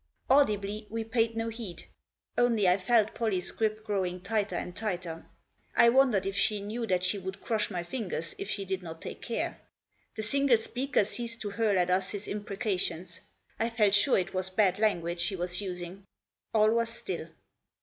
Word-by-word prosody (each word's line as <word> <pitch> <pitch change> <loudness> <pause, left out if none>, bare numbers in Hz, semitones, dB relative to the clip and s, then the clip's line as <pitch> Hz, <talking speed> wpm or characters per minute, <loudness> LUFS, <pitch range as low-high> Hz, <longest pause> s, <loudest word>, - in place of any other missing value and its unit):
Audibly, 210 -6 +3
we 225 +1 -2
paid 225 0 0
no 225 0 -1
heed. 220 -7 -7 0.5
Only 235 -5 +3
I 180 +1 +5
felt 220 +2 +3
Pollie's 205 -6 -1
grip 215 -1 -1
growing 190 -4 -1
tighter 200 0 -1
and 175 +1 -4
tighter. 180 -6 -4 0.5
I 235 - +7
wondered 240 -6 +4
if 195 0 -2
she 205 +1 +2
knew 220 +4 -4
that 185 -2 +1
she 190 +2 +1
would 190 +1 -6
crush 220 0 -1
my 180 -4 -3
fingers 175 -6 -4
if 195 - -4
she 200 -2 -1
did 190 0 -2
not 165 -2 -8
take - - -7
care. 235 - -3 0.6
The 220 - -3
single 275 +2 +3
speaker 245 +1 0
ceased 230 +2 -2
to 205 - -3
hurl 210 -2 +2
at 180 0 +2
us 185 +1 +2
his 205 0 -5
impreca 205 -1 -2
tions. 175 +1 -3 0.4
I 230 - +1
felt 215 -4 +3
sure 205 +6 +5
it 185 - -1
was 185 0 -1
bad 190 0 +2
language 175 -5 +1
he 200 - -2
was 180 +1 -1
using. 185 0 -6 0.4
All 215 0 +4
was 230 0 +1
still. 235 +11 -5
205 Hz, 185 wpm, -30 LUFS, 185-225 Hz, 0.6 s, I